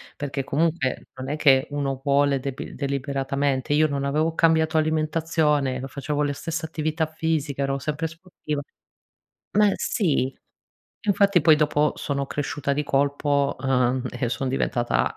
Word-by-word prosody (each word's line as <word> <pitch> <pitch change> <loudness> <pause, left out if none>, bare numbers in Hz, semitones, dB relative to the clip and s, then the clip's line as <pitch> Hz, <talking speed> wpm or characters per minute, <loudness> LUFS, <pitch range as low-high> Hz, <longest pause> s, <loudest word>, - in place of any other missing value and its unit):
perché 140 -1 -3
comunque 150 -1 -1
non 130 0 -6
è 150 - -2
che 135 -3 +5
uno 135 -2 -2
vuole 140 -1 +3
debil 135 0 -6
deliberatamente. 140 0 -1
Io 155 +1 +4
non 140 -1 -2
avevo 155 +3 0
cambiato 160 -1 +3
alimentazione, 155 -3 +1
o - - -4
facevo 145 +2 -3
la 145 -1 0
stessa 165 +3 -4
attività 155 0 -1
fisica, 155 -3 -1
ero 135 0 -1
sempre 150 +3 -3
sportiva 165 -3 -6 1.0
ma 210 -1 +6
sì. 145 - 0 0.7
Infatti 200 -3 +4
poi 155 -1 +6
dopo 150 0 +2
sono 140 -1 -2
cresciuta 140 0 -3
di 150 +2 0
colpo, 140 0 +1
uhm, 130 -1 +1
e 125 -1 -2
sono 130 +1 -2
diventata 120 -2 0
145 Hz, 140 wpm, -24 LUFS, 135-155 Hz, 1.0 s, ma